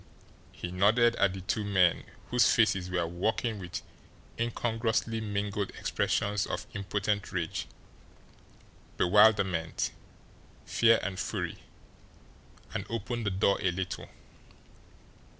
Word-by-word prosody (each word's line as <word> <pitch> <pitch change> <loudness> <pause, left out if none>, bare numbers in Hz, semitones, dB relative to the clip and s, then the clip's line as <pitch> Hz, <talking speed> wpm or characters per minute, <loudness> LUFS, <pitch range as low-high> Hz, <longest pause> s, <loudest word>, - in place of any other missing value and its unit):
He 90 - -6
nodded 110 +6 +4
at 100 -2 +3
the 95 - -6
two 105 +3 -1
men, 95 -4 +3 0.3
whose 125 0 +5
faces 100 -7 +2
were 90 -2 0
working 105 +6 -1
with 90 -2 -6 0.6
incongruously 115 -1 -1
mingled 100 -1 -2
expressions 100 0 0
of - - -4
impotent 100 0 -2
rage, 85 -3 -3 1.3
bewilderment, 95 -4 +3 0.7
fear, 115 0 +4
and 95 -1 -3
fury - - -3 1.1
and - - -2
opened 115 -1 -3
the - - +4
door 100 +1 +2
a 95 - +2
little. 95 +1 -4
100 Hz, 105 wpm, -30 LUFS, 95-110 Hz, 1.3 s, whose